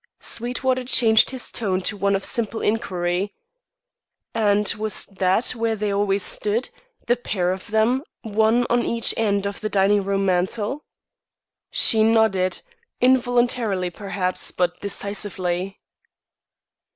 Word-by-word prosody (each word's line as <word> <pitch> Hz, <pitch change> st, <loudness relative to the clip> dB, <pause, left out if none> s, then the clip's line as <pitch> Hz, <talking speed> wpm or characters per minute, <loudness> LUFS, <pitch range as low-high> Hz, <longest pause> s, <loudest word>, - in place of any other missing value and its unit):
Sweetwater 255 Hz, +2 st, -1 dB
changed 225 Hz, -3 st, +4 dB
his 260 Hz, -1 st, -5 dB
tone 190 Hz, -5 st, -1 dB
to 205 Hz, -, -2 dB
one 200 Hz, 0 st, +1 dB
of 195 Hz, -, -2 dB
simple 225 Hz, -1 st, -2 dB
inquiry. 185 Hz, -3 st, -1 dB, 1.0 s
"And 210 Hz, -2 st, +2 dB
was 215 Hz, -1 st, -1 dB
that 190 Hz, +3 st, +1 dB
where 230 Hz, -2 st, -1 dB
they 210 Hz, -1 st, -2 dB
always 200 Hz, -1 st, +1 dB
stood, 215 Hz, +4 st, -1 dB, 0.3 s
the 240 Hz, -, +3 dB
pair 190 Hz, -7 st, -1 dB
of 185 Hz, 0 st, -6 dB
them, 220 Hz, +5 st, +2 dB, 0.2 s
one 220 Hz, +3 st, +2 dB
on 240 Hz, 0 st, +2 dB
each 230 Hz, 0 st, 0 dB
end 200 Hz, -3 st, 0 dB
of 200 Hz, 0 st, -4 dB
the 215 Hz, -, -2 dB
dining 200 Hz, 0 st, +3 dB
room 195 Hz, 0 st, 0 dB
mantel?" 205 Hz, +9 st, -1 dB, 0.8 s
She 220 Hz, -, +4 dB
nodded; 220 Hz, -4 st, +2 dB, 0.4 s
involuntarily, 245 Hz, -7 st, +2 dB
perhaps, 190 Hz, -1 st, -1 dB
but 175 Hz, -1 st, -1 dB
decisively. 195 Hz, -2 st, -3 dB
210 Hz, 125 wpm, -22 LUFS, 195-230 Hz, 1.0 s, changed